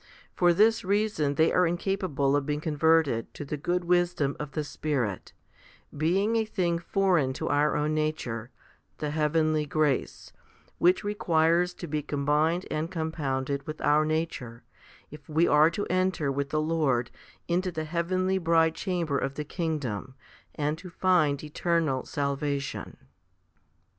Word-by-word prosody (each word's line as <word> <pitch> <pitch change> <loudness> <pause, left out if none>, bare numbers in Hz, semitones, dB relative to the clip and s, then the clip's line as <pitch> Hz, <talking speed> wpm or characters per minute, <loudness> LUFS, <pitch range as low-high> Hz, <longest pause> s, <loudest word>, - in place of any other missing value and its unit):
For 175 -1 +4
this 220 +6 +3
reason 195 -7 0
they 160 +3 +3
are 180 -1 +4
incapable 170 -6 0
of 145 - +1
being 150 0 -1
converted 155 -5 +2
to 145 - -6
the 145 - -3
good 175 +5 -1
wisdom 175 -5 +1
of 150 -2 -6
the 155 - -1
Spirit, 135 -10 -3 0.6
being 190 +9 +1
a 225 - +2
thing 175 -6 -1
foreign 170 -6 +1
to - - -4
our 145 +1 +2
own 150 +1 0
nature 155 -7 -2 0.5
the 150 -1 -3
heavenly 155 0 +1
grace 150 -2 -1 0.5
which 180 +2 +3
requires 175 -3 +1
to - - -7
be 150 0 -2
combined 150 +5 0
and 155 +2 -2
com 160 -3 -3
pounded 140 -2 -2
with 155 0 -6
our 150 +1 +4
nature, 155 -7 -3 0.5
if 150 +1 -13
we 160 +3 +3
are 150 +2 +5
to 205 +5 -3
enter 185 -6 0
with 140 +1 -2
the 155 - 0
Lord 145 -7 0 0.4
into 180 +2 0
the 155 -2 -4
heavenly 185 +3 0
bridechamber 165 -1 +1
of 135 0 -3
the 150 - -4
kingdom, 140 - -3 0.4
and 150 +2 -1
to 185 - -9
find 170 -6 +2
eternal 155 -3 0
salvation. 140 0 -3
155 Hz, 145 wpm, -27 LUFS, 145-175 Hz, 0.6 s, are